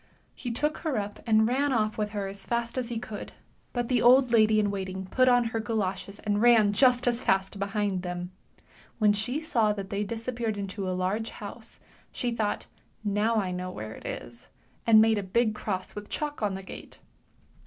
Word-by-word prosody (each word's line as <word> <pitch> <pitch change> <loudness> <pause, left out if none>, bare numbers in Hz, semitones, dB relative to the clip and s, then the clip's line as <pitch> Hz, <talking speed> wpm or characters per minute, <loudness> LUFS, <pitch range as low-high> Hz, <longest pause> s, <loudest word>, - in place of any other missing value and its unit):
He 245 - -6
took 295 +6 -1
her 310 -7 -1
up 205 0 -4
and 220 -1 +5
ran 275 +4 +1
off 215 -3 +1
with 210 -1 -1
her 205 -2 -3
as 195 0 -7
fast 235 -1 -2
as 250 -2 -2
he 235 - -3
could, 220 -2 -7 0.4
but 240 -1 -2
the 245 -2 +2
old 250 +1 +6
lady 215 -2 +5
in 205 -1 +1
waiting 190 -1 -4
put 255 +7 +3
on 245 -1 +5
her 225 - 0
galoshes 200 -3 -2
and 205 -1 -1
ran 225 -4 +6
just 250 +3 +4
as 240 0 +1
fast 195 -1 0
behind 200 -1 -1
them; 180 0 -5 0.7
when 210 -2 +4
she 245 +8 -1
saw 230 -9 +2
that 195 -2 -6
they 200 +1 0
disappeared 230 0 -3
into 195 -1 -4
a 185 - -1
large 205 +5 -1
house, - - -10 0.3
she 245 - -2
thought 220 -3 -1 0.4
now 210 +2 +1
I 195 -4 0
know 180 0 -4
where 110 -10 -6
it - - -9
is, 120 0 -7 0.4
and 220 -1 +8
made 220 -1 +3
a - - -1
big 215 +4 +1
cross 190 -3 -4
with 205 0 -8
chalk 295 -3 -3
on 205 -3 0
the 195 - -7
gate. - - -10
215 Hz, 200 wpm, -28 LUFS, 195-235 Hz, 0.7 s, and